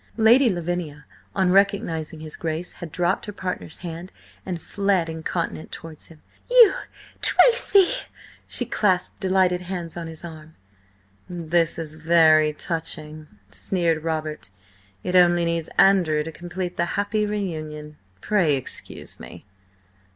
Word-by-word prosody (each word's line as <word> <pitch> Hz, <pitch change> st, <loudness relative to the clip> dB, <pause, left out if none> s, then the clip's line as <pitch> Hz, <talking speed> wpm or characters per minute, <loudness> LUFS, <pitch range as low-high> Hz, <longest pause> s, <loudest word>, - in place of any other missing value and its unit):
Lady 235 Hz, +3 st, +6 dB
Lavinia, 175 Hz, -5 st, -4 dB, 0.3 s
on 190 Hz, -2 st, +2 dB
recognising 180 Hz, -6 st, +1 dB
his 155 Hz, -1 st, -5 dB
Grace, 165 Hz, +1 st, -4 dB
had 170 Hz, -2 st, -7 dB
dropped 175 Hz, +3 st, -1 dB
her -, -, -4 dB
partner's 180 Hz, -5 st, -5 dB
hand 170 Hz, +2 st, -7 dB, 0.4 s
and 180 Hz, -3 st, -3 dB
fled 195 Hz, -1 st, 0 dB
incontinent 160 Hz, 0 st, -4 dB
towards 160 Hz, -2 st, -9 dB
him. 160 Hz, -2 st, -17 dB, 0.3 s
"You, 485 Hz, -4 st, +8 dB, 0.5 s
Tracy!" 435 Hz, -6 st, +5 dB, 0.6 s
She 245 Hz, -, +4 dB
clasped 190 Hz, -6 st, 0 dB
delighted 185 Hz, -2 st, +2 dB
hands 175 Hz, -2 st, -6 dB
on 170 Hz, -1 st, -5 dB
his 160 Hz, +1 st, -8 dB
arm. 160 Hz, -1 st, -11 dB, 0.7 s
"This 170 Hz, -1 st, 0 dB
is 160 Hz, -2 st, -4 dB
very 160 Hz, -1 st, +4 dB
touching," 155 Hz, -1 st, -4 dB, 0.2 s
sneered 165 Hz, -, 0 dB
Robert. 155 Hz, -, -4 dB, 0.5 s
"It 180 Hz, -, -2 dB
only 175 Hz, -1 st, +5 dB
needs 170 Hz, -1 st, -2 dB
Andrew 180 Hz, -6 st, +4 dB
to 160 Hz, -, -6 dB
complete 175 Hz, +2 st, -6 dB
the 170 Hz, -, +1 dB
happy 210 Hz, +1 st, 0 dB
reunion. 155 Hz, -7 st, -5 dB, 0.2 s
Pray 185 Hz, -9 st, +2 dB
excuse 130 Hz, -, -5 dB
me!" 85 Hz, -, -11 dB
170 Hz, 130 wpm, -23 LUFS, 160-190 Hz, 0.7 s, You